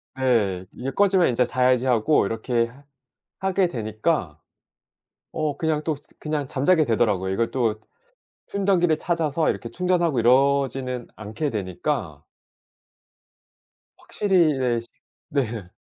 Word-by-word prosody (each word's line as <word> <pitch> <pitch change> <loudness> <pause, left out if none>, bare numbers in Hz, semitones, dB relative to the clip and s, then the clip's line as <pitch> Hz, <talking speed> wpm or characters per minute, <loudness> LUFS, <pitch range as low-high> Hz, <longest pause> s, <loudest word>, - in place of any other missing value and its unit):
네. 105 -8 +1
'이게 135 +2 -5
꺼지면 195 -3 +3
이제 125 0 +2
자야지.' 125 0 +2
하고 125 +1 +3
이렇게 115 +2 0
해 135 +4 -17 0.6
하게 190 -1 +1
되니까 110 - -2 0.9
어 155 -2 -2
그냥 155 -2 0
또 155 -2 -1
스 145 - -19
그냥 150 -2 -3
잠자게 155 +5 +2
되더라고요. 105 -6 +1
이걸 115 +3 0
또 115 -5 +1 0.7
충전기를 185 -5 +1
찾아서 165 -2 0
이렇게 115 - -4
충전하고 175 -2 +1
이러지는 130 0 +2
않게 110 +8 -4
되니까 95 - -3 1.8
확실히 185 -7 +2
네 125 -3 +1
시 115 - -15 0.4
네. 115 -9 -2
130 Hz, 260 characters per minute, -24 LUFS, 115-155 Hz, 1.8 s, 꺼지면